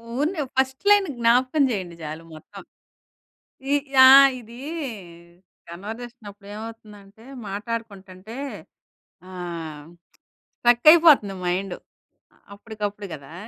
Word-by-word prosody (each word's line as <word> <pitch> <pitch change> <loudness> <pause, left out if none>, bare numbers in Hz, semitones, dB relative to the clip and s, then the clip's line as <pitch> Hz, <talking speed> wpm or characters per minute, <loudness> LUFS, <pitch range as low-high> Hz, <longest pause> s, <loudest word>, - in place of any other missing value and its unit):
ఊరినే 305 +4 -1 0.2
first 265 +3 0
line 410 -2 +5
జ్ఞాపకం 255 +5 +3
చేయండి 180 -5 -5
చాలు. 155 +2 -7
మొత్తం 155 - -13 1.1
ఇ - - +4 0.3
ఆ! - - +10 0.3
ఇదీ 235 +2 -13 1.1
కన్వర్జేషనప్పుడేమవుతుందంటే 210 0 -11 0.2
మాట్లాడుకుంటుంటే 205 -1 -7 0.9
ఆహ్, 165 -4 -7 0.7
స్ట్రక్కయిపోతంది 245 - +5
మైండ్. 180 +1 -2 0.8
అప్పుడికప్పుడు 205 -1 -6
గదా! 140 +2 -12
210 Hz, 75 wpm, -23 LUFS, 190-240 Hz, 1.1 s, ఆ